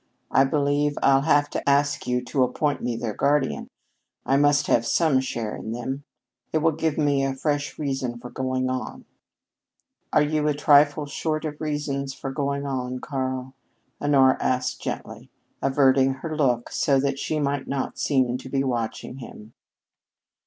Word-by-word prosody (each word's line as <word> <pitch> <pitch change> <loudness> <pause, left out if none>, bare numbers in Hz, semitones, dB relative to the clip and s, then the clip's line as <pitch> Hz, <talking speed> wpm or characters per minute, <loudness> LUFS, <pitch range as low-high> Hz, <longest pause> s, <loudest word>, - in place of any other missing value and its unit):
I 135 - +5
believe 145 +1 +1
I'll 135 0 +5
have 145 -1 +3
to - - -1
ask 140 0 +2
you 125 0 0
to 135 +1 -1
appoint 140 +4 0
me 120 -1 -2
their 115 -2 -3
guardian. 140 +4 +1 0.6
I 135 - +2
must 145 0 +4
have 115 - +3
some 145 +3 +2
share 115 -4 -3
in 110 - -5
them. 135 +4 -4 0.5
It - - +1
will 165 - +4
give 160 0 -1
me 145 -2 +2
a 135 -1 -1
fresh 145 +1 -2
reason 135 -5 -2
for 125 +1 -10
going 130 0 -1
on." 130 -3 -4 1.1
"Are 150 - +4
you 150 0 0
a 150 - +1
trifle 145 +1 +4
short 155 +2 -2
of 150 0 -5
reasons 140 -3 -2
for 135 0 -5
going 140 0 -2
on, 130 -2 -3
Karl?" 130 -1 -3 0.5
Honora 135 -2 +4
asked 125 0 -1
gently, - - -6 0.3
averting 135 -1 +3
her 155 +4 -5
look 125 -6 +1
so 140 -2 +2
that 140 0 -1
she 155 +1 -1
might 140 -1 -1
not 135 -1 -3
seem 130 -3 +1
to 130 - -10
be 135 0 0
watching 120 0 -3
him. 110 -2 -11
135 Hz, 165 wpm, -24 LUFS, 130-145 Hz, 1.1 s, I